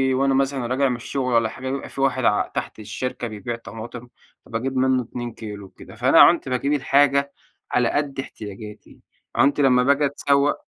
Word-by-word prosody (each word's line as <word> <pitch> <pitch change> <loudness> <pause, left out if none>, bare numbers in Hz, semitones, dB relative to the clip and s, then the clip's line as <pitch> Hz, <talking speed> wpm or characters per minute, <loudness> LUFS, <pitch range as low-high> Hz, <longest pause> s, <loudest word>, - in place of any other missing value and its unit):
وأنا 135 +1 +2
مثلًا 135 -2 0
راجع 130 +2 +1
من 125 - -1
الشغل 125 +1 -3
والّا 115 -1 +3
حاجة 130 +3 -6
بيبقى 135 0 -5
في 135 - -6
واحد 130 -2 +1
ع 105 - +2
تحت - - -5
الشركة 120 +3 -4
بيبيع 110 +2 -5
طماطم، 115 +1 -9 0.4
فباجيب 130 +3 -3
منه 130 -1 +2
2 120 0 -6
كيلو 105 -3 -8
وكده، 95 - -14
فأنا 130 +8 +4
عُنْت 170 -6 +5
باجيب 135 +3 0
الحاجة 140 0 +2 0.4
على 120 -2 +2
قدّ 145 -2 -2
احتياجاتي، 105 -4 -9 0.4
عُنْت 140 +5 +3
لمّا 125 -2 +4
باجي 140 +2 +3
أتسوّق 140 0 +1
130 Hz, 175 wpm, -22 LUFS, 115-140 Hz, 0.4 s, عُنْت